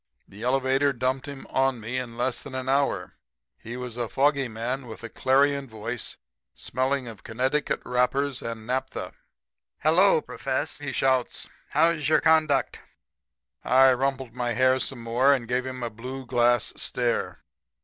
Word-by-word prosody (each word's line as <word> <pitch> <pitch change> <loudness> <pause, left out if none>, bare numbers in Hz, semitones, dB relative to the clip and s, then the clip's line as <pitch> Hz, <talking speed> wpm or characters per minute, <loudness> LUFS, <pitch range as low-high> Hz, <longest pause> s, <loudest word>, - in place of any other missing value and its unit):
The 100 +2 -13
elevator 135 +3 +2
dumped 130 +2 -1
him 140 -2 -8
on 135 -2 +1
me 115 +4 -4
in 120 -2 -7
less 125 0 -1
than 130 - -9
an 130 0 -4
hour. 135 -9 0 0.4
He 120 +2 -7
was 125 -2 -6
a 120 -2 -2
foggy 140 -1 +2
man 120 +4 -4
with 115 +1 -9
a 115 - -6
clarion 140 +2 +2
voice, 110 +1 -5 0.4
smelling 130 0 -1
of 110 -4 -9
Connecticut 130 +6 -1
wrappers 130 +2 +1
and 115 -1 -6
naphtha. 130 +3 -3 0.6
"'Hello, 165 +4 +4
Profess!' 135 0 -3
he 145 -2 -4
shouts. 130 -1 0 0.2
'How's 160 -1 +2
your 155 - +5
conduct?' 155 -4 +2 0.8
"I 130 0 +6
rumpled 130 -2 -2
my 120 -1 -1
hair 130 +2 +3
some 130 -3 -3
more 125 +5 +4
and 120 -3 -5
gave 125 +2 -1
him 130 -1 -5
a 120 - -3
blue 130 +4 -7
glass 120 -1 +2
stare. 120 -1 -2
130 Hz, 155 wpm, -26 LUFS, 120-135 Hz, 0.8 s, I